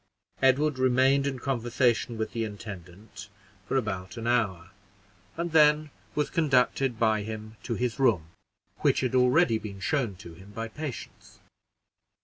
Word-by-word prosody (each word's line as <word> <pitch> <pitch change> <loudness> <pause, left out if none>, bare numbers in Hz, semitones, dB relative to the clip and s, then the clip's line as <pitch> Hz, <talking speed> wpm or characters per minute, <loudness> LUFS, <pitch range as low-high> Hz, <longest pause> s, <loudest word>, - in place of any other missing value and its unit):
Edward 135 +1 +3
remained 130 +2 +3
in 135 -2 -2
conversation 120 -1 0
with 110 - -3
the 115 - -2
intendant 100 -1 -9 0.4
for 135 - 0
about 100 -3 -3
an 115 - -5
hour, 100 -7 0 0.7
and 170 0 -2
then 150 -1 +4 0.2
was 150 - 0
conducted 135 -5 +2
by 110 -2 +2
him 110 +1 -7
to 120 - -3
his 125 +1 -2
room, 100 -12 +2 0.5
which - - +2
had 130 -2 -1
already 125 -1 +4
been 100 -2 -8
shown 120 -2 -1
to 85 -2 -11
him 95 +4 -14
by 115 +2 -4
Patience. 145 +2 -8
120 Hz, 140 wpm, -27 LUFS, 105-135 Hz, 0.7 s, then